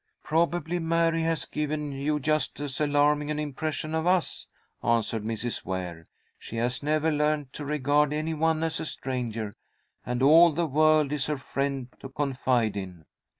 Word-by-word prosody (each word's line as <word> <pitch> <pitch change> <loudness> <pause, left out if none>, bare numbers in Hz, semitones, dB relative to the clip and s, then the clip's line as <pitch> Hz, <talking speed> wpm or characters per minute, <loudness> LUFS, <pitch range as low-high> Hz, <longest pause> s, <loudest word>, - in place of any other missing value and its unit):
"Probably 170 +1 0
Mary 165 0 +2
has 165 0 0
given 150 -1 -3
you 145 +2 -1
just 155 +1 0
as 145 0 -4
alarming 145 0 +2
an 150 - -1
impression 155 +1 -3
of 160 +1 0
us," 180 -2 +1 0.4
answered 115 -2 +1
Mrs. 115 +2 -3
Ware. 90 -3 -5 0.3
"She - - -9
has 120 +3 -1
never 155 +2 +1
learned 150 -2 0
to 145 - -6
regard 145 0 +2
any 155 +2 -1
one 160 0 +1
as 165 -1 -1
a - - -3
stranger, 115 -7 -4 0.5
and 125 +1 -2
all 160 +3 +7
the 170 +3 0
world 155 0 +3
is 145 -2 -1
her 150 -1 -1
friend 135 -1 -3
to 135 - -8
confide 130 -5 0
in." 90 -5 -7
150 Hz, 160 wpm, -27 LUFS, 130-155 Hz, 0.5 s, all